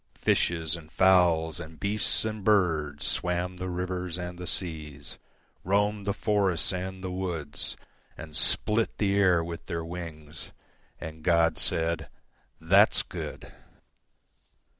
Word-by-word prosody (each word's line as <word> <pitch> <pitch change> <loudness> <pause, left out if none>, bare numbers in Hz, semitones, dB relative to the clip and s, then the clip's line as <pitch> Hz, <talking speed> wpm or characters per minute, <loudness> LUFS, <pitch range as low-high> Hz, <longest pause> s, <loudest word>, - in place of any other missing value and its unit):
Fishes 80 -2 +1
and 80 -2 -11
fowlsAnd 80 -4 +3
beasts 105 +2 +2
and 110 -2 -4
birdsSwam 90 -1 0
the 95 0 -3
rivers 90 -1 -3
and 90 0 -6
the 90 - -6
seas, 75 -5 -4 0.4
Roamed 100 +1 0
the - - +2
forests 100 -6 +1
and 95 +1 -5
the 95 - -4
woods, 85 -6 -3 0.4
And 80 -1 -9
split 110 +7 +2
the 100 -2 +1
air 90 -4 +4
with 85 0 -7
their 85 -2 -3
wings. 80 -3 -8 0.5
And 80 0 -8
God 85 -2 +3
said, 85 0 +2 0.5
"That's - - +4
good!" - - -7
90 Hz, 120 wpm, -27 LUFS, 80-95 Hz, 0.5 s, air